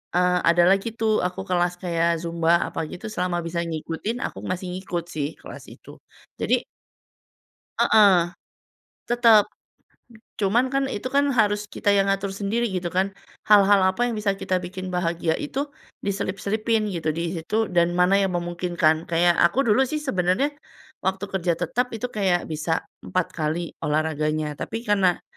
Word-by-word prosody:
eee, 180 Hz, 0 st, +3 dB
ada 170 Hz, +1 st, +4 dB
lagi, 195 Hz, +4 st, +1 dB
tuh, 220 Hz, -1 st, +2 dB
aku 180 Hz, +1 st, -3 dB
kelas 175 Hz, 0 st, +1 dB
kayak 170 Hz, -1 st, +1 dB
Zumba 170 Hz, 0 st, +2 dB
apa -, -, -4 dB
gitu 180 Hz, -, -9 dB
selama 180 Hz, -3 st, -1 dB
bisa 170 Hz, 0 st, -2 dB
ngikutin 165 Hz, +7 st, -4 dB
aku -, -, -6 dB
masih 185 Hz, 0 st, -3 dB
ngikut, 180 Hz, -2 st, -4 dB
sih, 150 Hz, -1 st, -3 dB
kelas -, -, -11 dB
itu -, -, -14 dB, 0.4 s
jadi -, -, +1 dB, 1.2 s
Heeh, 205 Hz, -3 st, +6 dB, 1.0 s
tetep, 230 Hz, -3 st, +6 dB, 1.0 s
cuman, 215 Hz, +5 st, +2 dB
kan, 275 Hz, 0 st, +1 dB
itu, 205 Hz, -, -5 dB
kan, 285 Hz, -, +5 dB
harus 205 Hz, -1 st, +3 dB
kita -, -, -2 dB
yang 195 Hz, 0 st, +3 dB
ngatur 195 Hz, 0 st, -1 dB
sendiri 225 Hz, +4 st, 0 dB
gitu, 175 Hz, -1 st, -2 dB
kan, 195 Hz, +1 st, +1 dB, 0.3 s
hal-hal 205 Hz, -1 st, +6 dB
apa 190 Hz, -, -8 dB
yang -, -, -3 dB
bisa 205 Hz, -2 st, 0 dB
kita 190 Hz, -1 st, -1 dB
bikin 185 Hz, +1 st, -6 dB
bahagia 170 Hz, -2 st, 0 dB
itu 285 Hz, 0 st, -3 dB, 0.4 s
diselip-selipin 205 Hz, +3 st, -1 dB
gitu 165 Hz, -2 st, -3 dB
di 170 Hz, -, -1 dB, 0.2 s
situ 165 Hz, +6 st, -7 dB, 0.2 s
dan 170 Hz, 0 st, +3 dB
mana 180 Hz, +2 st, +4 dB
yang 190 Hz, -2 st, -1 dB
memungkinkan. 175 Hz, -2 st, 0 dB
Kayak 170 Hz, +1 st, +4 dB
aku 250 Hz, +11 st, +1 dB
dulu, 210 Hz, -, +4 dB
sih, 300 Hz, +3 st, -3 dB
sebenarnya 210 Hz, +2 st, +1 dB, 0.6 s
waktu 190 Hz, +1 st, 0 dB
kerja 180 Hz, -2 st, +1 dB
tetap 245 Hz, +8 st, -1 dB
itu 225 Hz, +2 st, -3 dB
kayak 185 Hz, -6 st, 0 dB
bisa 160 Hz, +1 st, -1 dB, 0.2 s
4 185 Hz, -2 st, 0 dB
kali 160 Hz, +2 st, -2 dB
olahraganya, 155 Hz, 0 st, -1 dB
tapi 225 Hz, -, -4 dB
karena 195 Hz, -5 st, +2 dB
185 Hz, 155 wpm, -24 LUFS, 170-210 Hz, 1.2 s, Heeh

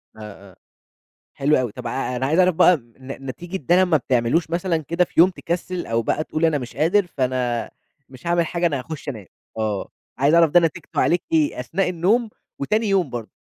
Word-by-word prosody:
آه، 105 Hz, -3 st, -11 dB
آه، -, -, -22 dB, 0.8 s
حلو 145 Hz, +2 st, +2 dB
أوي، 125 Hz, -4 st, -1 dB
طَب -, -, -7 dB
ع 130 Hz, -1 st, -3 dB
أنا 125 Hz, +2 st, -1 dB
عايز 155 Hz, +6 st, +1 dB
أعرف 185 Hz, -2 st, +4 dB
بقى 180 Hz, +1 st, +6 dB
ن 130 Hz, +2 st, -11 dB
نتيجة 175 Hz, +8 st, -5 dB
ده 170 Hz, +2 st, +1 dB
لمّا 185 Hz, +1 st, +5 dB
ما 170 Hz, -4 st, +3 dB
بتعملوش 130 Hz, +5 st, 0 dB
مثلًا 170 Hz, 0 st, 0 dB
كده 170 Hz, +4 st, 0 dB
في -, -, -4 dB
يوم 175 Hz, +3 st, +8 dB
تكسِّل، 175 Hz, 0 st, -4 dB
أو 115 Hz, 0 st, 0 dB
بقى 135 Hz, +7 st, -1 dB
تقول 155 Hz, +1 st, -1 dB
أنا 160 Hz, -2 st, +2 dB
مش 125 Hz, -3 st, -8 dB
قادر، 175 Hz, +7 st, +2 dB
فأنا 125 Hz, -5 st, -2 dB, 0.4 s
مش 130 Hz, +4 st, -11 dB
هاعمل 170 Hz, 0 st, +2 dB
حاجة 170 Hz, +1 st, -2 dB
أنا 145 Hz, -5 st, +1 dB
هاخُشّ 150 Hz, +2 st, -7 dB
أنام، 110 Hz, -8 st, -7 dB, 0.3 s
آه 110 Hz, -3 st, -2 dB, 0.3 s
عايز 140 Hz, +4 st, +3 dB
أعرف 165 Hz, -2 st, +5 dB
ده 175 Hz, -, +7 dB
نتيجتُه 170 Hz, 0 st, -2 dB
عليك 175 Hz, 0 st, +2 dB
إيه؟ 155 Hz, -5 st, +1 dB
أثناء 180 Hz, +9 st, -1 dB
النوم 200 Hz, +7 st, +1 dB, 0.3 s
وتاني 215 Hz, +10 st, 0 dB
يوم 190 Hz, -6 st, +2 dB
برضه؟ 120 Hz, -3 st, -6 dB
155 Hz, 205 wpm, -22 LUFS, 125-175 Hz, 0.8 s, يوم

